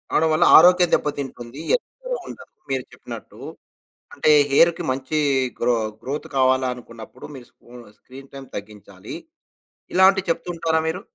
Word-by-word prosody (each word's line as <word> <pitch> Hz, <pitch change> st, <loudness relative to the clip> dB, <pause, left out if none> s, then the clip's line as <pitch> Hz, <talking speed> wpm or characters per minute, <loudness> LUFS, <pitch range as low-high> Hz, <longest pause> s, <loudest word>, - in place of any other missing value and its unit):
ఆడవాళ్ళ 155 Hz, 0 st, +3 dB
ఆరోగ్యం 180 Hz, +1 st, +6 dB
దెబ్బతింటుంది. 135 Hz, -3 st, -3 dB, 0.2 s
ఎప్పుడు -, -, -6 dB
వుండదు -, -, -12 dB, 0.2 s
మీరు 130 Hz, -1 st, -1 dB
చెప్పినట్టు. -, -, -11 dB, 0.8 s
అంటే, -, -, +1 dB, 0.2 s
హెయిర్‌కి 170 Hz, +5 st, +4 dB
మంచీ 130 Hz, +4 st, -2 dB, 0.4 s
గ్రొ 120 Hz, +1 st, +2 dB, 0.3 s
గ్రోత్ 140 Hz, +3 st, -5 dB
కావాలనుకున్నప్పుడు. 125 Hz, -3 st, -2 dB
మీరు 125 Hz, -3 st, -11 dB
స్క్రూ 120 Hz, -, -20 dB, 0.2 s
స్క్రీన్ 135 Hz, +1 st, -14 dB
టైమ్ 135 Hz, -1 st, -10 dB
తగ్గించాలి. 100 Hz, -1 st, -10 dB, 0.8 s
ఇలాంటివి 190 Hz, 0 st, +4 dB
చెప్తూ 165 Hz, -, -2 dB
ఉంటారా 160 Hz, -1 st, 0 dB
మీరు? 170 Hz, +3 st, -3 dB
135 Hz, 120 wpm, -22 LUFS, 125-165 Hz, 0.8 s, ఆరోగ్యం